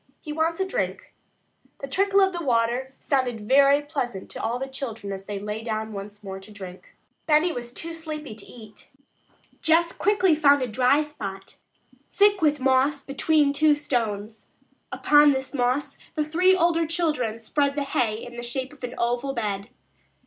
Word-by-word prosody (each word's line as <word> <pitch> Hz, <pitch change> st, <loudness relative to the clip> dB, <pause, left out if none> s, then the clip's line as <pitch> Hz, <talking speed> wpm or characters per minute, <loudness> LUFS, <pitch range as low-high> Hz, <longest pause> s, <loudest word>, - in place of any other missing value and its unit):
"He 300 Hz, -, -7 dB
wants 325 Hz, +2 st, 0 dB
a 380 Hz, -, +1 dB
drink." -, -, -3 dB, 0.7 s
The 275 Hz, -, -6 dB
trickle 395 Hz, +7 st, +2 dB
of 380 Hz, -1 st, +3 dB
water 245 Hz, +1 st, 0 dB
sounded 255 Hz, -5 st, 0 dB
very 275 Hz, +6 st, +4 dB
pleasant 250 Hz, -9 st, -4 dB
to -, -, -6 dB
all 230 Hz, +2 st, -1 dB
the 265 Hz, -, -3 dB
children 230 Hz, -7 st, -6 dB
as 195 Hz, 0 st, -8 dB
they 205 Hz, 0 st, -4 dB
lay 210 Hz, +2 st, -4 dB
down 220 Hz, -1 st, -3 dB
once 205 Hz, +1 st, -8 dB
more 190 Hz, -1 st, -6 dB
to 190 Hz, +2 st, -14 dB
drink. 190 Hz, -3 st, -11 dB, 0.3 s
Benny 310 Hz, +3 st, +4 dB
was 240 Hz, -4 st, -6 dB
too 330 Hz, +6 st, -5 dB
sleepy 310 Hz, -5 st, -6 dB
to 215 Hz, -1 st, -11 dB
eat. 215 Hz, -3 st, -13 dB, 0.7 s
Jess 335 Hz, +1 st, +3 dB
quickly 395 Hz, -4 st, +2 dB
found 285 Hz, -3 st, +4 dB
a -, -, -1 dB
dry 255 Hz, +5 st, +3 dB
spot 200 Hz, -11 st, -7 dB, 0.5 s
thick 410 Hz, -1 st, +3 dB
with 295 Hz, -2 st, +2 dB
moss 265 Hz, +2 st, +2 dB
between 285 Hz, +1 st, +2 dB
two 300 Hz, +1 st, +4 dB
stones. 225 Hz, -7 st, -3 dB, 0.4 s
Upon 295 Hz, -1 st, +5 dB
this 265 Hz, +1 st, -4 dB
moss 255 Hz, +2 st, -1 dB, 0.2 s
the 305 Hz, -2 st, 0 dB
three 360 Hz, +5 st, +4 dB
older 335 Hz, -2 st, +2 dB
children 300 Hz, -9 st, -1 dB
spread 280 Hz, +5 st, 0 dB
the 290 Hz, -, 0 dB
hay 240 Hz, -5 st, 0 dB
in 240 Hz, 0 st, -10 dB
the -, -, -4 dB
shape 260 Hz, +3 st, -4 dB
of 275 Hz, -, -18 dB
an 250 Hz, 0 st, -5 dB
oval 245 Hz, +3 st, -1 dB
bed. 205 Hz, -4 st, -3 dB
270 Hz, 170 wpm, -25 LUFS, 225-305 Hz, 0.7 s, Upon